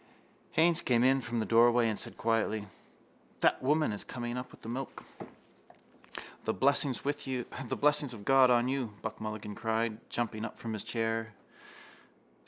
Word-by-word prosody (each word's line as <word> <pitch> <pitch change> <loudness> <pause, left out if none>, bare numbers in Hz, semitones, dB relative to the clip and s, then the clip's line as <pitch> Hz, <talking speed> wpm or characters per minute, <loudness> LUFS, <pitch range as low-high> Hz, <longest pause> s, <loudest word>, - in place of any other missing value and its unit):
Haines 170 +1 +4
came 120 -1 +2
in 135 +1 +4
from 120 -1 -2
the 110 - 0
doorway 120 +1 +5
and 110 -2 -1
said - - -7
quietly: 110 -2 0 0.8
—That - - +3
woman 150 +1 +2
is 105 - -4
coming 120 -1 -5
up 125 0 -5
with - - -17
the - - -8
milk. 130 +3 -5 1.4
—The - - 0
blessings 140 -1 +3 0.2
of 130 -2 -1
God 135 -1 +6
on 120 0 +4
you! 130 -5 -2
Buck - - -5
Mulligan 110 -1 -5
cried, 110 0 -1
jumping 110 -2 -2
up 110 - -6
from 115 -1 -5
his 105 - -3
chair. 115 -1 -2
120 Hz, 150 wpm, -31 LUFS, 110-130 Hz, 1.4 s, God